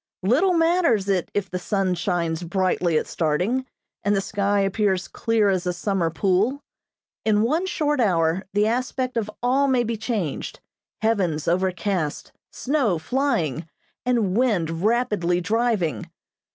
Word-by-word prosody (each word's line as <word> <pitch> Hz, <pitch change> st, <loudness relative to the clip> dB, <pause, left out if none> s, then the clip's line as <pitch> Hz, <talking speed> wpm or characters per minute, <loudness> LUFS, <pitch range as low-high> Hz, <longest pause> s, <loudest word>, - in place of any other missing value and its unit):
Little 315 Hz, -, +3 dB
matters 330 Hz, -, +2 dB
it 190 Hz, -3 st, 0 dB
if 200 Hz, -2 st, -1 dB
the 180 Hz, -, -2 dB
sun 190 Hz, 0 st, 0 dB
shines 175 Hz, -2 st, -1 dB
brightly 180 Hz, -2 st, 0 dB
at -, -, 0 dB
starting, 180 Hz, +12 st, -1 dB, 0.4 s
and 205 Hz, +1 st, +2 dB
the -, -, +2 dB
sky 200 Hz, 0 st, 0 dB
appears 195 Hz, -1 st, 0 dB
clear 225 Hz, -3 st, +1 dB
as 185 Hz, -2 st, 0 dB
a 180 Hz, -, 0 dB
summer 175 Hz, -1 st, -1 dB
pool. 195 Hz, -, +1 dB, 0.6 s
In 215 Hz, -1 st, +3 dB
one 315 Hz, +10 st, +1 dB
short 295 Hz, -5 st, 0 dB
hour 170 Hz, -5 st, +2 dB
the 205 Hz, +1 st, +3 dB
aspect 255 Hz, +2 st, -1 dB
of 220 Hz, -2 st, -1 dB
all 265 Hz, +3 st, +3 dB
may 255 Hz, -3 st, +2 dB
be 230 Hz, -1 st, -2 dB
changed, 215 Hz, -, -3 dB, 0.4 s
heavens 185 Hz, -9 st, 0 dB
overcast, 180 Hz, -2 st, -1 dB, 0.2 s
snow 255 Hz, -, 0 dB
flying, 170 Hz, -, -1 dB, 0.3 s
and 230 Hz, -7 st, +1 dB
wind 175 Hz, -10 st, +1 dB
rapidly 210 Hz, -6 st, +1 dB
driving. 205 Hz, -, 0 dB
200 Hz, 140 wpm, -23 LUFS, 180-240 Hz, 0.6 s, Little